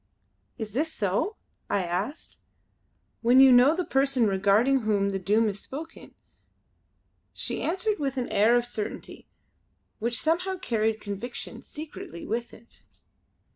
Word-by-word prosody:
"Is 215 -2 -6
this 310 +6 0
so?" 220 - -1 0.3
I 200 - +1
asked 190 - -4 0.8
"when 245 +2 +5
you 270 -1 +9
know 250 +5 +6
the 360 0 -2
person 270 -3 +2
regarding 205 +7 +3
whom 205 -3 +1
the 195 - -2
Doom 210 +5 +2
is 205 -1 -3
spoken." 320 +4 -9 1.2
She - - -3
answered 405 +4 -1
with 275 -2 -2
an 250 - -1
air 215 +3 +4
of 240 0 +2
certainty 225 -3 -6 0.7
which 235 +1 -1
somehow 360 +4 0
carried 220 -7 -1
conviction, 210 +4 -6
secretly, 295 - -9
with 235 +2 -3
it. 230 +1 -18
240 Hz, 135 wpm, -27 LUFS, 210-275 Hz, 1.2 s, you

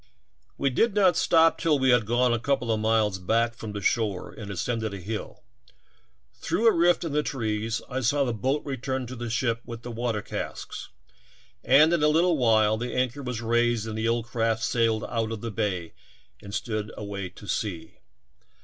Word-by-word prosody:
We 140 - +1
did 215 - +2
not 190 -3 +4
stop 165 -1 +4
till 160 -3 +2
we 130 -1 +3
had 120 -4 +3
gone 120 +1 +2
a 120 - 0
couple 125 -1 0
of 110 - +1
miles 110 -3 +1
back 115 +5 +1
from 110 -2 -7
the 105 0 -5
shore 105 -5 0
and 105 -3 -9
ascended 110 +2 -2
a - - -7
hill. 105 +4 -6 0.9
Through 225 - -2
a 225 - +7
rift 175 +1 +3
in 165 - -3
the 150 +1 +2
trees 110 -5 -2
I 130 0 -3
saw 140 +3 +2
the 120 -3 -1
boat 130 +7 -1
return 130 -1 -3
to 125 +2 -7
the 120 -1 -5
ship 115 0 0
with 115 -1 -9
the 120 - -6
water 115 -2 -2
casks - - -6 0.7
and 155 +4 +6
in 170 - +2
a 150 - +5
little 165 +3 +3
while 110 -3 +4
the 125 +2 -4
anchor 130 +2 -1
was 125 -3 -4
raised 120 -1 +1
and 110 -1 -5
the 110 +1 -1
old 115 0 0
craft 115 -1 -1
sailed 115 -2 +1
out 115 -1 -2
of 110 -2 -5
the 115 - -4
bay 95 -6 -2 0.5
and 100 - -10
stood 110 -1 -3
away 100 -2 -5
to 105 - -14
sea. 90 -6 -4
115 Hz, 195 wpm, -26 LUFS, 110-130 Hz, 0.9 s, a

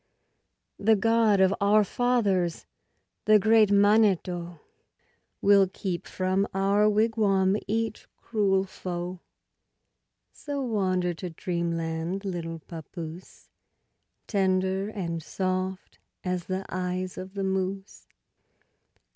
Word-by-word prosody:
The 220 +2 +4
God 225 -1 +3
of 190 0 +4
our 210 +1 +5
Fathers, 200 -7 0 0.6
the 215 0 +7
great 215 +1 +4
Maneto, 195 -5 +2 0.8
Will 200 -1 +6
keep 185 -1 -5
from 185 +2 0
our 200 +2 +3
wigwam 205 -3 +2
each 225 +1 -2
cruel 195 -4 +1
foe; 180 -1 -6 1.1
So 285 -1 -5
wander 185 -6 0
to 180 +2 -6
dreamland, 170 +2 -3
little 170 -3 -4
papoose, 165 +2 -10 0.7
Tender 190 0 0
and 170 -6 -4
soft 185 +2 -3 0.2
as 180 -2 -2
the 185 +1 -3
eyes 185 0 -3
of 190 +1 -8
the 195 - -2
moose. 190 +1 -3
190 Hz, 95 wpm, -27 LUFS, 180-205 Hz, 1.1 s, the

